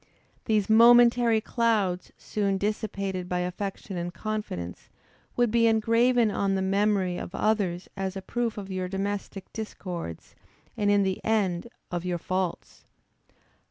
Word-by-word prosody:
These 215 -3 +2
momentary 235 0 +6
clouds, 215 -7 0
soon 200 -2 -1
dissipated 200 -3 -3
by 180 0 0
affection 190 +1 -4
and 175 0 -3
confidence, 190 - -5 0.5
would 240 -2 +2
be 230 0 +4
engraven 230 +1 +3
on 195 -1 0
the 190 - 0
memory 195 -2 +1
of 175 - -7
others 195 -5 0
as 195 0 -3
a - - -5
proof 235 +1 -2
of 195 -2 -6
your 185 -1 -2
domestic 195 0 -4
discords, 180 - -6 0.4
and 205 -1 +1
in 205 -1 +4
the 190 -1 -2
end, 205 -3 0 0.2
of 175 -1 -2
your 180 -1 -1
faults. 185 +1 -3
200 Hz, 135 wpm, -27 LUFS, 185-220 Hz, 0.5 s, momentary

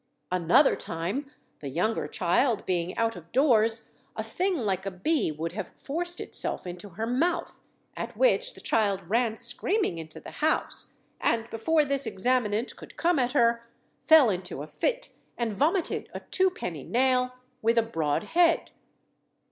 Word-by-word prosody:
Another 180 - +4
time 190 - -4 0.3
the 140 - -6
younger 180 +11 0
child, 220 +5 +1
being 175 -1 -1
out 230 0 +1
of 170 -1 -12
doors, 230 -5 +3 0.2
a - - -3
thing 375 0 -1
like 195 -6 -1
a - - +1
bee 230 - 0
would 160 +2 -4
have 205 +4 -5
forced 350 +4 -3
itself - - -1
into 180 +3 -7
her 220 +5 -4
mouth, 300 +9 -1 0.4
at - - -6
which - - +2
the - - -12
child 200 -5 0
ran 230 +2 +1
screaming 390 - 0
into 160 -1 -8
the - - -10
house, 310 +1 -1 0.3
and 230 -1 +1
before 300 +7 +2
this 275 -2 0
examinant 220 +1 0
could - - -13
come 340 -3 +2
at 250 0 0
her, 235 -3 +2 0.4
fell 305 -8 +7
into 180 -6 -4
a - - -8
fit, - - -2 0.3
and 235 -3 -1
vomited 325 - 0
a - - -4
twopenny 355 - 0
nail, 250 0 +1 0.3
with 230 +1 +2
a 230 - +5
broad 160 -7 -1
head. 335 +7 +2
230 Hz, 155 wpm, -27 LUFS, 185-290 Hz, 0.4 s, fell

